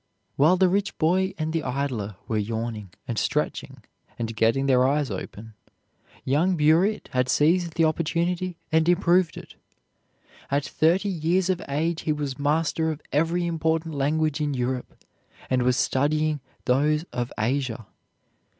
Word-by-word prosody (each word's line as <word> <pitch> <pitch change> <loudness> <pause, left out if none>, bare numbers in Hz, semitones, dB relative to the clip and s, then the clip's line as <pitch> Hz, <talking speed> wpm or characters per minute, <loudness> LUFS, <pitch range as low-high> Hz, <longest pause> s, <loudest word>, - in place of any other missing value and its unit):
While 160 +6 +4
the 190 0 +4
rich 200 +2 -1
boy 185 +4 +1
and 160 0 -2
the 165 - 0
idler 125 -7 -3
were 110 -2 0
yawning 110 -1 -4 0.2
and 115 -4 -2
stretching - - -2 0.3
and 115 -1 -4
getting 115 +5 +2
their 130 -1 +4
eyes 140 -2 0
open, 105 +3 -7 0.7
young 165 +7 +2
Burritt 165 +8 +2
had 125 0 0
seized 170 +2 +2
the 165 - +3
opportunity 170 +3 -1
and 160 +1 +3
improved 175 -1 +3
it. - - -10 1.0
At 140 +1 0
thirty 175 +6 +2
years 180 +2 +1
of 180 - -2
age 160 +4 -1
he 155 - -1
was 145 -2 -4
master 160 +2 +1
of 155 -1 -5
every 165 +4 +1
important 160 -1 -1
language 155 +2 0
in 145 -2 -1
Europe 125 0 -3 0.5
and 130 -1 +3
was 125 +1 +2
studying 150 +2 +1 0.3
those 150 +5 +2
of 120 0 -3
Asia. 120 -1 -1
150 Hz, 145 wpm, -25 LUFS, 130-165 Hz, 1.0 s, While